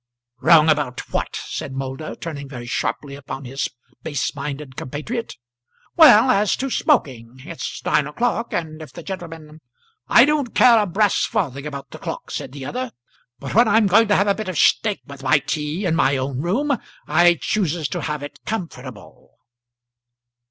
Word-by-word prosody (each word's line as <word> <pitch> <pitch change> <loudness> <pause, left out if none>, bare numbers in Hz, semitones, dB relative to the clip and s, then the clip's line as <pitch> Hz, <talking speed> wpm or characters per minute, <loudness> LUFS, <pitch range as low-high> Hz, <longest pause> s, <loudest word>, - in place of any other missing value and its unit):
"Wrong 160 +1 +6
about 150 -5 +1
what?" - - -2
said 135 - -5
Moulder, 135 +3 -5
turning 145 -4 -7
very 120 -3 -8
sharply 140 +3 -3
upon 135 -1 -7
his 135 +3 -3 0.3
base 145 -4 -2
minded 140 -2 -6
compatriot. 210 - -5 0.6
"Well, 260 -6 +8
as 205 -2 +2
to 270 0 -4
smoking. 130 - 0
It's 170 -1 -6
nine 150 - +2
o'clock, 235 +8 -1
and 160 -2 -4
if 155 - -10
the 170 - -10
gentleman 165 -4 -8 0.2
" 455 -1 -40
"I 240 - +9
don't 290 -5 -1
care 235 -2 +7
a 210 - +1
brass 200 +3 +2
farthing 150 - -2
about 140 -3 -8
the - - -9
clock," - - -6
said 130 - -5
the 135 -1 -8
other, 255 - -4 0.5
"but 135 - -7
when 235 +3 +5
I'm 225 0 +4
going 210 +4 +5
to 205 - +3
have 200 - +3
a 200 - +4
bit 215 -1 -5
of 180 - -4
steak 210 +5 +2
with 140 -2 -11
my 130 +2 +4
tea, 150 +6 -3
in 165 -2 +1
my 140 -4 +2
own 130 0 -3
room, 265 - 0 0.3
I 175 +3 +5
chooses 175 -7 -1
to - - -3
have 150 -2 -3
it 145 - -9
comfortable." 135 - -7
160 Hz, 175 wpm, -21 LUFS, 140-210 Hz, 0.6 s, I